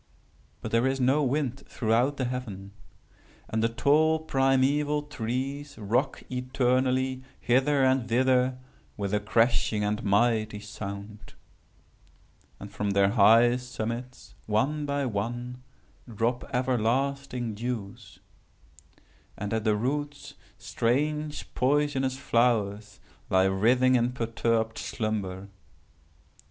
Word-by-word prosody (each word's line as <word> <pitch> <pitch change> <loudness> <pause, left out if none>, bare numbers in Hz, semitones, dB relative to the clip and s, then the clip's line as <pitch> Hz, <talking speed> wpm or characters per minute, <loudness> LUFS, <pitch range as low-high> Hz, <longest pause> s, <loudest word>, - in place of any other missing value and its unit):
But - - -5
there 115 +3 +3
is 135 0 -1
no 135 +4 +3
wind 135 -1 -1
throughout 120 +5 +1
the 130 - -1
heaven. 110 -6 -5 0.8
And 110 - -1
the 115 - +2
tall 155 +6 +3
primeval 145 0 +1
trees 140 +1 -4
rock 120 +6 -1
eternally 130 0 0 0.2
hither 135 +3 +2
and 130 -2 +2
thither 125 +1 +2 0.4
with 100 -1 -3
a 105 - +3
crashing 110 0 +1
and 105 +1 -1
mighty 110 0 +1
sound. 105 0 -8 1.2
And 100 - -9
from 105 0 -2
their 100 0 +3
high 115 +3 +5
summits, 125 0 -6
one 140 +8 0
by 140 -1 -1
one, 120 +3 -4 0.5
drop 115 +3 -1
everlasting 125 0 -1
dews. 110 -3 -6 1.2
And 105 +1 -4
at 110 0 -1
the 105 -1 +3
roots 145 +5 -3 0.2
strange 150 +5 -2
poisonous 135 -1 +1
flowers 110 -6 0 0.3
lie 95 0 +4
writhing 120 +7 +3
in 125 0 +2
perturbed 115 -1 -1
slumber. 100 -3 -3
125 Hz, 105 wpm, -27 LUFS, 110-135 Hz, 1.2 s, high